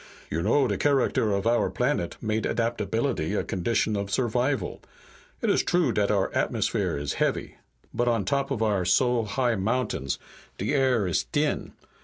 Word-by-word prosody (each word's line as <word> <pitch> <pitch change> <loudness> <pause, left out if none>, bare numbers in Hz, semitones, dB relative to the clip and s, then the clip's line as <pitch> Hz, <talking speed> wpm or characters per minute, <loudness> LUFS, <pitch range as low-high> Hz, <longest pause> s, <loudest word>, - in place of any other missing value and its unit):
You 80 - -1
know 130 +8 +3
de 100 -4 -2
character 135 -6 +2
of 100 +1 -1
our 115 -4 +2
planet 125 -2 -1
made 110 -1 -1
adaptability 115 - -1
a - - 0
condition 105 +3 0
of 100 -1 -2
survival. 120 0 0 0.6
It - - +2
is - - +3
true 175 -7 +2
dat 100 -1 +1
our 100 -2 +1
atmosphere - - 0
is 70 0 -2
heavy, - - -1 0.4
but 120 - 0
on 115 -5 +1
top 140 +6 0
of 115 -5 -1
our 105 -4 +1
so 120 +6 +2
high 120 +3 0
mountains 100 - -1 0.4
de 105 +9 -1
air 130 -6 +2
is 90 -3 0
t'in. - - -1
110 Hz, 165 wpm, -26 LUFS, 100-125 Hz, 0.6 s, know